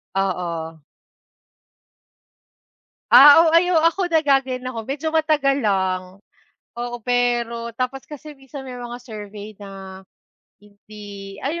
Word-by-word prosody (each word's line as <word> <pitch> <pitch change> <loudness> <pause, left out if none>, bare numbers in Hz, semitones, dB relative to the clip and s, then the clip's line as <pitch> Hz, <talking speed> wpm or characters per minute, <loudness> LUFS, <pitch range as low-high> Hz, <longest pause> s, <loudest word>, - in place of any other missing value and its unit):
Oo. 170 -4 -3 2.3
Ah, 290 +3 +10
oo. 320 - +3
Ay 355 +2 +4
ako 340 +2 +2
naggaganyan 270 -5 +1
ako 250 -3 -5
medyo 280 +6 -4
matagal 290 -4 +1
lang. 190 -2 -1 0.6
Oo, 240 0 -5
pero 240 -1 -1
tapos 255 +3 -4
kasi 300 0 -11
minsan 270 0 -11
may 250 - -7
mga 245 0 -7
survey 210 -3 -10
na 195 -1 -11 0.5
hindi 205 -1 -12
ay 320 +5 -2
240 Hz, 110 wpm, -21 LUFS, 200-275 Hz, 2.3 s, Ah